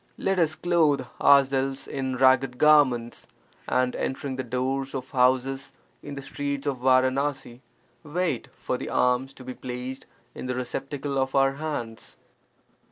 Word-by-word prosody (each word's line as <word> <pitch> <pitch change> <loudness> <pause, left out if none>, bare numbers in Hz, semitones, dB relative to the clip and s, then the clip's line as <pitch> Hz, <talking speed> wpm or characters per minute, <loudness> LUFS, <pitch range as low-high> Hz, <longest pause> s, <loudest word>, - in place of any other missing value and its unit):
Let 195 -1 0
us 155 -2 +2
clothe 165 -4 +2 0.2
ourselves 135 -1 +3
in 130 -2 -3
ragged 130 -1 +4
garments, 130 -6 +3 0.4
and 125 0 +1
entering 135 0 -3
the 130 - -3
doors 130 +3 -2
of 130 0 -5
houses 130 +1 +1 0.3
in 145 - -8
the 140 - -7
streets 140 +1 -4
of 140 -3 -1
Varanasi, 130 0 +1 0.4
wait 160 -3 -2
for - - -3
the - - -5
alms 125 +2 +1
to 130 - -11
be 130 0 -6
placed 125 +1 -7 0.3
in - - -7
the 125 - -2
receptacle 135 +2 -3
of 135 0 -1
our 135 0 +4
hands. 135 -7 -6
135 Hz, 145 wpm, -26 LUFS, 130-140 Hz, 0.4 s, ragged